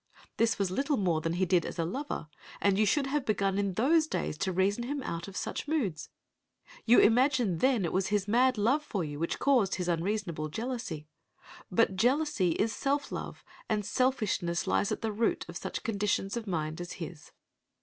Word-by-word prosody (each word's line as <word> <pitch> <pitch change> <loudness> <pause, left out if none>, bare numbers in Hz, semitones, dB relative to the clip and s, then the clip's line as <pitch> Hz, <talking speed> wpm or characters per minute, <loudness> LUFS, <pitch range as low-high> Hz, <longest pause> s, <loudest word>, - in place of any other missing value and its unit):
This 230 0 +2
was 195 -2 0
little 275 +7 0
more 175 -6 +1
than 165 +1 -1
he 185 +2 +1
did 180 -2 +3
as - - -6
a 165 - 0
lover, 265 - -4 0.3
and 200 0 +2
you 215 - +4
should 275 +7 +2
have 280 +1 -1
begun 200 -4 0
in 200 -2 -1
those 310 - +3
days 155 - -2
to 195 -1 0
reason 195 +6 +1
him 280 +1 -3
out 170 -3 -4
of 195 - -8
such - - -4
moods. 215 - -1 0.8
You 240 - +7
imagined 240 - +3
then 255 -8 +3
it - - -3
was 190 0 +1
his 205 -1 0
mad 250 +3 +3
love 245 +9 +2
for 200 - -3
you 145 -2 -5
which 165 - -1
caused 250 -9 +3
his 180 -1 -3
unreasonable 170 -2 -1
jealousy. 220 - -4 0.6
But 190 0 +2
jealousy 245 - +2
is 215 +5 0
self 280 +1 -1
love, - - -6 0.3
and 210 -2 0
selfishness 210 -8 0
lies 95 +1 +1
at - - -2
the 220 - 0
root 220 +2 0
of - - -9
such - - -5
conditions 205 -2 -1
of 230 -2 -4
mind 160 -2 -2
as 175 - -6
his. 165 -3 -8
205 Hz, 195 wpm, -30 LUFS, 175-250 Hz, 0.8 s, You